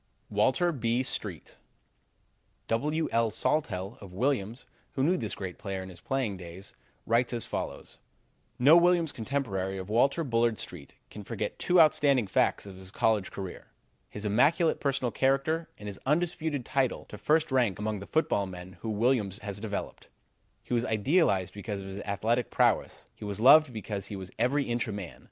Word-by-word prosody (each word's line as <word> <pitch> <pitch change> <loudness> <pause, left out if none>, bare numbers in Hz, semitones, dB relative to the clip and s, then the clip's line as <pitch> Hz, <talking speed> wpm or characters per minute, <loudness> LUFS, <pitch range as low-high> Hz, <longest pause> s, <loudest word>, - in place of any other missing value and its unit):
Walter 130 - +2
B. 120 -3 0
Street 95 - -5 1.1
W. 150 +8 0
L. 115 0 +2
Sawtelle 105 -5 -1
of 100 -3 -10
Williams, 120 +2 -1 0.3
who 130 - 0
knew 175 +6 +3
this 110 - -3
great 95 -2 -6
player 95 -2 -4
in 95 - -9
his 90 -2 -13
playing 130 -7 -1
days, 90 +2 -9 0.3
writes 120 +2 +2
as 115 - +4
follows: - - -5 0.6
"No 140 +6 +7
Williams 175 -2 +4
contemporary 105 -7 -2
of 95 +1 -7
Walter 135 +8 +3
Bullard 115 -4 +1
Street 80 -6 -9 0.2
can - - -8
forget - - -4
two 180 0 +3
outstanding 145 -6 +5
facts 95 - +1
of 95 -2 -10
his 95 0 -9
college 105 -1 +1
career: 95 -2 -7 0.4
his 105 +1 -6
immaculate 145 - +3
personal 135 -3 0
character 135 +6 +1
and 105 - -9
his 100 -1 -7
undisputed 160 -3 0
title 135 -3 0
to - - -10
first 155 0 +2
rank 120 -7 +2
among 105 0 -2
the 100 - -9
football 105 -10 +1
men 90 0 -10
whom 110 -2 -3
Williams 110 -4 +1
has 100 0 -4
developed. 105 -1 -5 0.5
He - - -5
was 120 -1 +2
idolized 110 - +2
because 100 0 -5
of 95 - -8
his 95 +1 -6
athletic 110 +5 -1
prowess; - - +1
he - - -12
was 105 0 -5
loved 140 +4 +7
because 105 -3 -4
he 100 - -6
was 95 -1 -7
every 135 +5 +2
inch 120 -2 -1
a - - -3
man. 100 -4 -7
115 Hz, 175 wpm, -29 LUFS, 100-135 Hz, 1.1 s, No